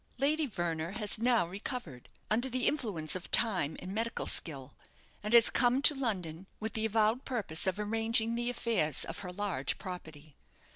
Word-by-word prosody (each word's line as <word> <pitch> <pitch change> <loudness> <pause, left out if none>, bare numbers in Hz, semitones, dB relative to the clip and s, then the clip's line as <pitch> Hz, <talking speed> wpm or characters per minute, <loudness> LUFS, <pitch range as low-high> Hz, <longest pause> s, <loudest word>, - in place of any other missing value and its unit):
"Lady 295 +3 +1
Verner 170 -4 -3
has 215 0 +1
now 235 -4 +3
recovered, 180 - -7 0.2
under 240 +5 +1
the 255 -1 -1
influence 195 - 0
of 185 - -6
time 185 -10 +3
and 185 +1 -7
medical 230 +2 -2
skill, 140 -5 +1 0.5
and 210 +3 +1
has 235 0 +7
come 245 +1 +3
to 290 - +5
London 190 - -3
with 220 0 -3
the 220 0 0
avowed 220 +3 +2
purpose 200 -10 -1
of 190 - 0
arranging 225 +2 0
the 240 +1 -1
affairs 220 - +1
of - - -7
her 180 -2 -6
large 180 -8 -2
property. 160 -5 -9
210 Hz, 165 wpm, -31 LUFS, 175-235 Hz, 0.5 s, has